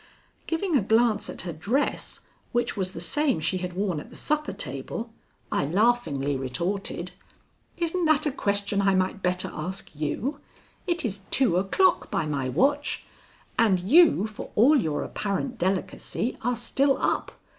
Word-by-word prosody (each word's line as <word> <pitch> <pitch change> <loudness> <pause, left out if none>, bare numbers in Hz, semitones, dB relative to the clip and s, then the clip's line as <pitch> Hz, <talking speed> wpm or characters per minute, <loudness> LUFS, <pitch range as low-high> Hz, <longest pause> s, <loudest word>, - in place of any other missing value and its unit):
Giving 330 +1 0
a 265 - +5
glance 220 +1 +2
at - - -5
her 170 -1 -5
dress, 220 - -1 0.3
which 240 0 0
was 190 -1 -2
the - - -6
same 295 - +1
she 160 +4 0
had 180 0 -4
worn 185 -4 -1
at - - -10
the - - -13
supper 300 0 -1
table, 140 - -5 0.4
I - - +1
laughingly 155 - +1
retorted: 170 +7 -3 0.7
"Isn't 345 +1 0
that 310 -1 +3
a 295 - +1
question 200 -4 +1
I 195 -1 +3
might 185 +1 0
better 180 0 0
ask 180 +5 -6
you? 180 - -2 0.5
It 345 -4 0
is 205 -3 -2
two 245 -10 +3
o'clock 200 - +2
by 195 -6 0
my 140 -4 -2
watch, 285 - +1 0.6
and 205 -5 +4
you, 275 - +5
for 215 -1 -7
all 260 +9 +6
your 155 -5 -1
apparent 220 +5 -3
delicacy, 190 +5 -1
are 245 +2 0
still 270 +4 +1
up. - - 0
205 Hz, 155 wpm, -26 LUFS, 180-270 Hz, 0.7 s, all